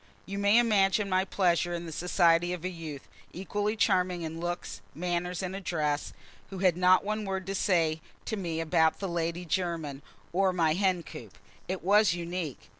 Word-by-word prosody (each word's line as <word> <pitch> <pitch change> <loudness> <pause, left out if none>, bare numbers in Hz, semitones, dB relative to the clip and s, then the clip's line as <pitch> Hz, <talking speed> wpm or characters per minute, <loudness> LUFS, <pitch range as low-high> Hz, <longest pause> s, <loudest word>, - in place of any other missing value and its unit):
You 200 +1 -5
may 200 +2 +4
imagine 210 -3 +3
my 185 0 +2
pleasure 175 -2 +1
in 170 0 -5
the 165 - -7
society 175 +1 +2
of 180 -1 -6
a - - 0
youth, 160 -6 -8 0.3
equally 205 +4 -2
charming 185 -5 +1
in 160 0 -5
looks, 175 -11 -4
manners 180 +2 -2
and 185 +1 -3
address, 155 -6 -2 0.4
who 195 - -7
had 185 -2 +3
not 180 +1 +4
one 215 +1 -2
word 190 -1 -3
to 195 - -3
say 165 -5 +1 0.2
to 220 - -2
me 170 -5 -3
about 160 -1 +2
the 195 - -4
Lady 170 0 -2
Jermyn 165 -5 -2 0.3
or 190 +1 +2
my 165 -3 +2
hen 185 -1 +1
coop. - - -11 0.3
It 185 0 -4
was 205 0 +4
unique. 170 -4 -5
180 Hz, 180 wpm, -29 LUFS, 165-195 Hz, 0.4 s, may